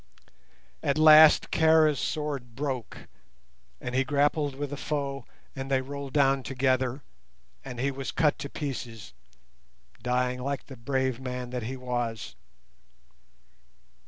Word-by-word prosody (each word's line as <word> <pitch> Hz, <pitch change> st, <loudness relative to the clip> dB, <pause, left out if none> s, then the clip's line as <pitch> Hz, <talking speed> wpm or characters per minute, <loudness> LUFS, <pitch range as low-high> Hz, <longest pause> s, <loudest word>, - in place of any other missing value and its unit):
At 140 Hz, -, 0 dB
last 155 Hz, 0 st, +7 dB
Kara's 160 Hz, -2 st, +4 dB
sword 140 Hz, -6 st, -3 dB
broke, 135 Hz, -3 st, -5 dB, 0.7 s
and 125 Hz, -, -5 dB
he 130 Hz, +1 st, +2 dB
grappled 145 Hz, 0 st, +1 dB
with 145 Hz, 0 st, -4 dB
a -, -, -2 dB
foe, 140 Hz, -2 st, -3 dB, 0.3 s
and 135 Hz, 0 st, -5 dB
they 135 Hz, -1 st, +3 dB
rolled 140 Hz, 0 st, -7 dB
down 135 Hz, -2 st, +3 dB
together, 130 Hz, 0 st, 0 dB, 0.6 s
and 125 Hz, -, -8 dB
he 140 Hz, +2 st, 0 dB
was 135 Hz, 0 st, -5 dB
cut 155 Hz, -3 st, +1 dB
to 140 Hz, -, -5 dB
pieces, 120 Hz, -8 st, -6 dB, 0.9 s
dying 125 Hz, +1 st, 0 dB
like 140 Hz, +1 st, -3 dB
the 135 Hz, -, -10 dB
brave 130 Hz, 0 st, -1 dB
man 125 Hz, -1 st, -5 dB
that 125 Hz, -1 st, -3 dB
he 130 Hz, -, -5 dB
was. 120 Hz, -3 st, -3 dB
135 Hz, 130 wpm, -27 LUFS, 125-145 Hz, 0.9 s, last